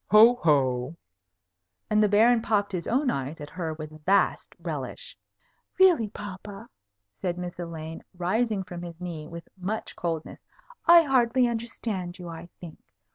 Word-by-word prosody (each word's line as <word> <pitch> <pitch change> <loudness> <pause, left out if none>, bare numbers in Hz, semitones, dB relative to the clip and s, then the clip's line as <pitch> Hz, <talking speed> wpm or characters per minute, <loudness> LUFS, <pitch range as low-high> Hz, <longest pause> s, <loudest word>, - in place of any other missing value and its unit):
Ho! 220 +3 +8
ho!" 135 - +1 0.9
and 215 0 +3
the 210 - +4
Baron 225 +3 +5
popped 205 -2 +1
his 180 -3 -3
own 260 +2 +2
eyes 140 +4 -4
at 145 0 -8
her 165 -3 -4
with 155 0 -9
vast 195 +4 +2
relish. - - -6 0.6
"Really, 355 - +5
papa," 200 -1 -9 0.5
said 180 -2 -1
Miss 180 0 -6
Elaine, 165 -2 -6 0.2
rising 205 +3 0
from 175 -2 -8
his 170 -1 -8
knee, 165 -4 -6
with 170 +1 -9
much 195 +4 -4
coldness, 165 -2 -4 0.5
"I 340 0 +9
hardly 255 -3 +3
understand 225 -6 -4
you, 175 -2 -8
I 165 +1 -9
think. 170 -3 -10
185 Hz, 145 wpm, -27 LUFS, 165-225 Hz, 0.9 s, I